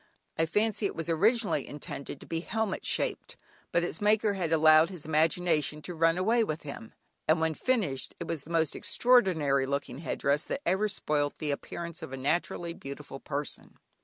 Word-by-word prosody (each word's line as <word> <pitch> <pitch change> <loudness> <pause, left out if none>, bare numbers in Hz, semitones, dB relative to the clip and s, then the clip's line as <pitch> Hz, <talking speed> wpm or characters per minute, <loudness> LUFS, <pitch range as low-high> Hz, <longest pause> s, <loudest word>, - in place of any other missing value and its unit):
I 165 - +1
fancy 210 +3 +1
it - - -7
was 165 +1 -4
originally 200 - +2
intended 140 -1 -7
to - - -12
be 165 - -2
helmet 215 +3 -2
shaped, - - -2 0.3
but 170 - +2
its 175 0 -2
maker 210 0 +3
had 180 -5 -2
allowed 155 0 +6
his 180 -6 -7
imagination 160 0 +1
to 180 - -5
run 165 +1 +3
away 225 +5 +3
with 155 -6 -3
him, 140 -6 -8 0.3
and 160 +1 +4
when 160 0 +1
finished, 185 - -1
it - - -5
was 160 -4 -3
the - - -15
most 160 -3 +1
extraordinary 165 - +3
looking 140 -1 -3
headdress 145 -1 0
that 280 - -3
ever 200 +4 +2
spoilt 150 -6 0
the 150 -2 -2
appearance 170 +3 -5
of - - -7
a - - -4
naturally 170 +4 -1
beautiful 140 -2 -8
person. 145 +1 -5
165 Hz, 180 wpm, -29 LUFS, 150-190 Hz, 0.3 s, allowed